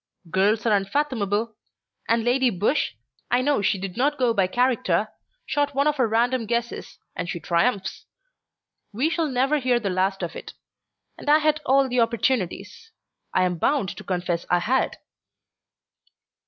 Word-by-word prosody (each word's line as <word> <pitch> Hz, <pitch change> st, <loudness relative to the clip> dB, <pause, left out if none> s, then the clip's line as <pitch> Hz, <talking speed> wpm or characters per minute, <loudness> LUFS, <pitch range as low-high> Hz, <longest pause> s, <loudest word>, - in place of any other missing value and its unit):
"Girls 205 Hz, +5 st, +2 dB
are 220 Hz, -3 st, +4 dB
unfathomable! 215 Hz, -1 st, -1 dB, 0.5 s
And 230 Hz, 0 st, +2 dB
Lady 250 Hz, +2 st, +3 dB
Busshe 205 Hz, -, 0 dB, 0.3 s
I 245 Hz, +1 st, +2 dB
know 285 Hz, -5 st, +2 dB
she 200 Hz, 0 st, +1 dB
did 190 Hz, -1 st, -6 dB
not 285 Hz, +4 st, +1 dB
go 245 Hz, -3 st, +2 dB
by 195 Hz, -4 st, +2 dB
character 215 Hz, -4 st, +1 dB, 0.4 s
shot 290 Hz, -1 st, -1 dB
one 280 Hz, +1 st, +2 dB
of 300 Hz, -1 st, +1 dB
her 250 Hz, -3 st, +2 dB
random 230 Hz, +1 st, +1 dB
guesses, 235 Hz, +1 st, -3 dB, 0.2 s
and 180 Hz, -1 st, -4 dB
she 170 Hz, -, -3 dB
triumphs. 190 Hz, +4 st, -1 dB, 0.8 s
We 260 Hz, +10 st, 0 dB
shall 330 Hz, -2 st, 0 dB
never 270 Hz, +3 st, +1 dB
hear 250 Hz, -2 st, +2 dB
the 200 Hz, -5 st, -2 dB
last 190 Hz, +1 st, 0 dB
of 170 Hz, -, -4 dB
it. -, -, -8 dB, 0.7 s
And -, -, -5 dB
I 300 Hz, -, +7 dB
had 305 Hz, 0 st, +1 dB
all 270 Hz, +1 st, +4 dB
the 250 Hz, -1 st, 0 dB
opportunities. 235 Hz, -, -1 dB, 0.4 s
I'm 180 Hz, -2 st, +1 dB
bound 275 Hz, -, +1 dB
to -, -, -8 dB
confess 175 Hz, -2 st, -2 dB
I 175 Hz, -, +4 dB
had." 235 Hz, +10 st, 0 dB
235 Hz, 155 wpm, -24 LUFS, 195-265 Hz, 0.8 s, I